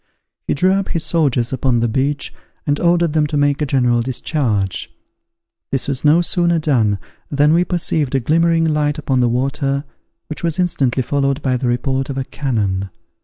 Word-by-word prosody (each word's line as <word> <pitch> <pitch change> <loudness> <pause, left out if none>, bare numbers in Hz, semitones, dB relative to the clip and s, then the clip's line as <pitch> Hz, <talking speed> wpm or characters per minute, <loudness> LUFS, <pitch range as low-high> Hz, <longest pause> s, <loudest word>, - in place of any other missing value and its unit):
He - - +1
drew 185 +6 +3
up 195 0 -1
his 165 - -2
soldiers 135 -7 +1
upon 130 -2 +1
the 120 - +1
beach, 140 +5 -1 0.3
and 145 -1 0
ordered 170 -2 +2
them 155 -1 +2
to 150 - -2
make 145 0 +1
a 150 - 0
general 125 -3 +2
discharge. 115 - -2 0.8
This 135 - -1
was 140 -2 -2
no 155 +3 +5
sooner 170 0 +2
done, 120 -10 +1 0.3
than 145 +1 +3
we 170 +2 +4
perceived 160 -6 -1
a - - +3
glimmering 165 +5 +2
light 150 -1 0
upon 135 -4 0
the 120 -1 +3
water 135 +3 -1 0.4
which 155 - -7
was 165 -1 0
instantly 140 -8 +1
followed 140 +2 -1
by 130 -2 +1
the 125 0 -2
report 130 +2 -1
of 135 - -4
a 135 - -1
cannon. 100 -9 -2
140 Hz, 180 wpm, -18 LUFS, 125-155 Hz, 0.8 s, no